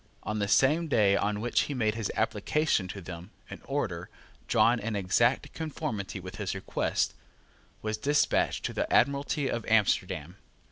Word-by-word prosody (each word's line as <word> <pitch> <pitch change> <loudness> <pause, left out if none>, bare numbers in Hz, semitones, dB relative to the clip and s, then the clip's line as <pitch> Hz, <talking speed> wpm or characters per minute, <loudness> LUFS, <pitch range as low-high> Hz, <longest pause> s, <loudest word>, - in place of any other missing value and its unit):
On 110 0 -2
the 100 - 0
same 150 +10 +3
day 105 -8 +4
on 105 +1 0
which 120 +1 +2
he 145 - -2
made 110 -4 +1
his 110 -2 -3
application 150 -11 +1
to 100 +1 -7
them, 85 +1 -8 0.2
an - - -8
order, 100 -12 -3 0.4
drawn 120 +1 +4
in 110 0 -3
exact 100 +6 +1
conformity 145 - -4
with 95 +1 -9
his 100 -2 -3
request, 95 - -1 0.7
was 110 0 -2
despatched 145 +1 +1
to - - -2
the - - -2
Admiralty 140 +1 +2
of 120 -3 -2
Amsterdam. 95 -6 +1
110 Hz, 155 wpm, -29 LUFS, 100-135 Hz, 0.7 s, day